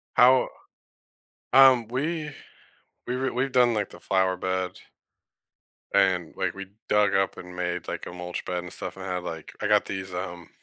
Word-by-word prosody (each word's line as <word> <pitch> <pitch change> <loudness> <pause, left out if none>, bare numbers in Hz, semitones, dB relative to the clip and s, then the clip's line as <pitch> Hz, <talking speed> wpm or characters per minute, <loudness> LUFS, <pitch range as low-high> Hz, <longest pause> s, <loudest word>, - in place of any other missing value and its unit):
How 125 +1 +6 1.0
um, 130 -4 +7
we 150 +4 -2 0.8
we 125 +1 -2
were 130 0 -1
we've 130 +2 -1
done, 125 -2 +4
like, 105 -2 -1
the - - -13
flower 95 -1 +1
bed 95 0 -2 1.2
and, 95 -4 +2
like, - - -1
we 95 -1 -8 0.2
dug 105 -2 +3
up 95 -1 +1
and 90 0 -9
made, 90 -1 -3
like, - - -4
a - - -8
mulch 90 0 -5
bed 90 -1 -2
and 90 - -9
stuff - - -6
and 95 - -7
I 90 - -2
had, 90 - -3
like, 80 -2 -7
I - - 0
got - - +4
these, 95 -1 -5
um, 90 -2 -6
95 Hz, 180 wpm, -26 LUFS, 90-125 Hz, 1.2 s, um